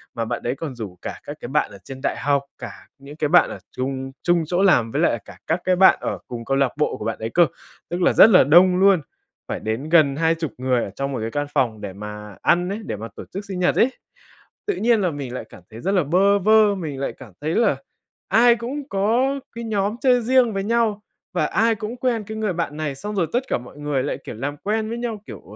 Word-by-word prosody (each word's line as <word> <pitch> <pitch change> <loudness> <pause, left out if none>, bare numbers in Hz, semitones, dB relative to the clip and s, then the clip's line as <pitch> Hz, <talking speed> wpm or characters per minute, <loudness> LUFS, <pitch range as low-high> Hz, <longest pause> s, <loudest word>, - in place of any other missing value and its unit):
mà 115 -1 -2
bạn 120 +1 -4
ấy 125 +3 -1
còn 140 -3 -6
rủ 105 -6 -7
cả - - -6
các 145 +1 -6
cái - - -5
bạn 150 -6 0
ở 100 - -11
trên 135 0 -9
đại - - 0
học, 140 0 +1 0.2
cả - - -9
những 140 +2 -11
cái 150 - 0
bạn 175 - +5
ở - - -6 0.2
chung 135 +1 -3
chung 175 -2 +3
chỗ 180 +2 +1
làm 120 - +4
với - - 0
lại 115 - +2
cả - - -13
các 165 +3 +1
cái 185 0 +3
bạn 190 +1 +6
ở - - -3
cùng 115 -2 -7
câu 135 0 0
lạc 135 -2 +3
bộ 150 - 0
của 105 - -7
bạn 115 - -3
ấy 110 +1 -3
cơ. 175 +4 +5 0.4
Tức 175 +1 -3
là 175 - +4
rất 220 - +8
là 180 - +7
đông 180 +6 +6
luôn, 195 -4 +5 0.5
phải - - -3
đến 110 +8 -3
gần 155 -5 +5
20 165 -1 0
người 130 -1 +1
ở - - -7
trong 140 0 -3
một - - -2
cái 115 +1 -3
căn 145 0 -1
phòng 120 -7 0
để 95 -2 -6
mà 105 0 -9
ăn 175 +1 +2
ấy, 205 +3 -3
để - - -3
mà 110 +2 -6
tổ - - -8
chức 200 +2 -5
sinh 190 -2 -5
nhật 180 - +2
ấy. 240 - +4 0.8
Tự 410 - 0
nhiên 225 -1 +2
là 180 -3 +1
mình 140 -4 -6
lại - - -4
cảm 90 - -14
thấy 115 - -9
rất 195 - 0
là 185 - +3
bơ 195 +7 +3
vơ, 215 +1 +5
mình 150 -7 -5
lại 140 - -2
cảm 125 -7 -12
thấy 155 +2 -1
là 235 - +3 0.5
ai 235 +1 +6
cũng 270 +5 -5
có 235 +8 +1 0.2
cái 235 - -5
nhóm 205 0 -1
chơi 250 -2 +4
riêng 245 -1 +3
với 195 0 -2
nhau, 225 -2 +1 0.3
và - - +1
ai 225 0 +2
cũng 215 +4 -6
quen 240 -3 0
cái 220 +2 -7
người 215 -4 -1
bạn 165 -3 -3
này, 150 -3 -3
xong 205 +7 -6
rồi 170 -4 +1
tất 245 - +3
cả - - +1
mọi 125 +4 -13
người 145 -3 -1
lại, 145 - -2
kiểu, - - -6
làm 145 +5 -4
quen 215 +4 -2
với 235 - -3
nhau, 230 -4 -4
kiểu, - - -9
170 Hz, 260 wpm, -22 LUFS, 135-210 Hz, 0.8 s, rất